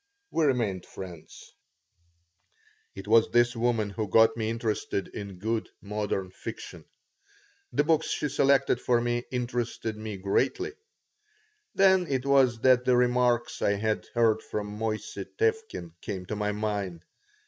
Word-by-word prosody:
We 160 - +2
remained 110 -10 0
friends 90 -4 -10 1.4
It 95 +1 -8
was 115 +1 +5
this 120 +1 +3
woman 115 -3 0
who 105 +1 -3
got 110 +4 +5
me 110 -1 -2
interested 110 -3 -2
in 100 -3 -7
good, 110 +4 -2
modern 100 -2 -3
fiction. - - -8 0.9
The - - +2
books 160 0 +2
she 150 - -1
selected 140 -2 +2
for 120 -1 +2
me 120 0 -1
interested 120 -3 -2
me 110 -2 -5
greatly. 370 - 0 1.0
Then 190 -2 +5
it 135 -2 -1
was 130 -4 +3
that 130 -1 +5
the 125 -1 +3
remarks 125 -1 +2
I 100 - +3
had 110 +1 -1
heard 110 -2 +3
from 105 0 -5
Moissey 110 -1 -3
Tevkin 445 - -1
came 95 -3 -5
to 105 - -4
my 105 0 -1
mind. 100 -5 -3
115 Hz, 135 wpm, -28 LUFS, 105-125 Hz, 1.4 s, was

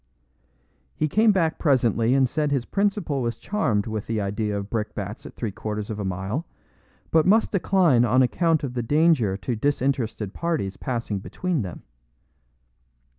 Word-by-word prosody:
He 155 - 0
came 215 +8 +4
back 170 -5 +1
presently 120 - +2
and 135 -1 +4
said 150 +4 -1
his 135 -4 0
principal 195 -8 0
was 120 -1 -2
charmed 120 - 0
with 110 -2 -4
the 115 -1 -1
idea 105 +1 -2
of 100 0 -4
brickbats 105 0 -4
at - - -13
three 110 - -3
quarters 105 +1 -5
of 105 - -5
a - - -2
mile, 95 - -3 0.6
but 160 0 +4
must 220 +4 +4
decline 175 - +3
on 125 +2 +4
account 165 +5 +1
of 130 -3 -3
the 125 - -1
danger 145 - +2
to 120 +5 -3
disinterested 125 -5 -1
parties 160 - -2
passing 115 -5 -3
between 175 - -2
them. 90 -5 -7
125 Hz, 160 wpm, -24 LUFS, 105-160 Hz, 0.6 s, came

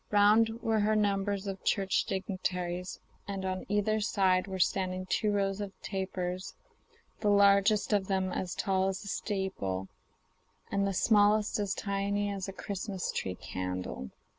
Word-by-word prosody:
Round 210 +2 +5
her 225 - -5
were 215 -2 +1
numbers 200 -1 +1
of 195 -1 -5
Church 195 -2 +1
dignitaries, 180 -2 -3 0.3
and 195 -1 -4
on 185 0 -3
either 210 +1 +1
side 190 -3 +2
were 190 -1 -4
standing 185 0 0
two 210 +3 +1
rows 200 0 0
of 200 -1 -7
tapers, 185 -1 -3 0.6
the 210 - +1
largest 200 +1 +4
of 195 -2 +2
them 190 -1 0
as 185 0 -3
tall 190 -2 +1
as 190 +1 -3
a - - -9
steeple, 190 - -2 0.8
and 200 0 +1
the 195 - -1
smallest 210 +1 +4
as 200 -2 -1
tiny 200 0 -1
as 195 -1 -4
a - - -4
Christmas 195 -1 -4
tree 90 - -3
candle. 90 -7 -5
195 Hz, 150 wpm, -31 LUFS, 185-205 Hz, 0.8 s, Round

